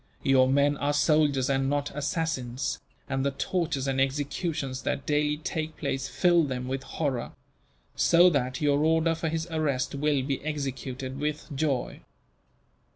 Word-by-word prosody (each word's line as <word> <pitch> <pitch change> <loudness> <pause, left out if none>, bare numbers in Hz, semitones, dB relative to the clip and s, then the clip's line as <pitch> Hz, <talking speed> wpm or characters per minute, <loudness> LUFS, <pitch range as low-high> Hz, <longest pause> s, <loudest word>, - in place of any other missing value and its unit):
Your 130 -1 +5
men 140 +1 +3
are 145 +1 0
soldiers 145 -3 +3
and 135 -1 +1
not 145 0 -1
assassins, 145 -4 -2 0.3
and 135 0 -1
the 140 - +2
tortures 150 -1 -2
and 135 0 +1
executions 140 0 -2
that 140 - -2
daily 150 0 +1
take 155 0 -4
place 135 -2 -2
fill 175 -2 +3
them 125 -3 -3
with 135 +1 -2
horror; 135 -4 -3 0.6
so 175 +1 +6
that 130 -3 -1
your 145 0 +3
order 160 +1 +3
for 165 0 -2
his 160 0 -2
arrest 150 -5 0
will 140 -1 +1
be 135 0 -2
executed 135 -3 -4
with 150 0 -3
joy. 135 -3 -1
145 Hz, 150 wpm, -27 LUFS, 135-155 Hz, 0.6 s, so